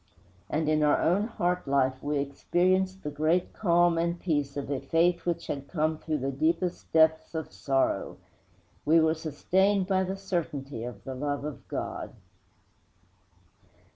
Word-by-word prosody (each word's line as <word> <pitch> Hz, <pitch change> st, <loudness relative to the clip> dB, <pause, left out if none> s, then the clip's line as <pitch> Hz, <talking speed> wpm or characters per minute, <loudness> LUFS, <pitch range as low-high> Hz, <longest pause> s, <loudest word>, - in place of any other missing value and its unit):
And 155 Hz, 0 st, 0 dB
in 155 Hz, 0 st, +2 dB
our 150 Hz, -1 st, +4 dB
own 195 Hz, +6 st, +2 dB
heart 180 Hz, -7 st, -1 dB
life 130 Hz, -1 st, +1 dB
we 145 Hz, 0 st, -1 dB
experienced 185 Hz, +7 st, 0 dB
the 150 Hz, -, -3 dB
great 155 Hz, +5 st, +1 dB
calm 175 Hz, -3 st, +3 dB
and 170 Hz, +1 st, -1 dB
peace 145 Hz, -5 st, -1 dB
of 140 Hz, 0 st, -4 dB
a 140 Hz, -, 0 dB
faith 165 Hz, +5 st, +1 dB
which 170 Hz, -, -1 dB
had 140 Hz, -1 st, -4 dB
come 155 Hz, 0 st, -1 dB
through 155 Hz, -2 st, -2 dB
the 135 Hz, 0 st, -2 dB
deepest 165 Hz, +6 st, -1 dB
depths 160 Hz, 0 st, +3 dB
of 160 Hz, -1 st, -4 dB
sorrow. 135 Hz, -1 st, 0 dB, 0.7 s
We 160 Hz, +2 st, +5 dB
were 160 Hz, 0 st, +3 dB
sustained 185 Hz, +5 st, +1 dB
by 190 Hz, 0 st, +1 dB
the 190 Hz, +1 st, -4 dB
certainty 150 Hz, -, -3 dB
of 120 Hz, -5 st, -8 dB
the 135 Hz, -, -5 dB
love 145 Hz, +2 st, -3 dB
of 150 Hz, -2 st, -7 dB
God.' -, -, -5 dB
160 Hz, 155 wpm, -28 LUFS, 145-175 Hz, 0.7 s, We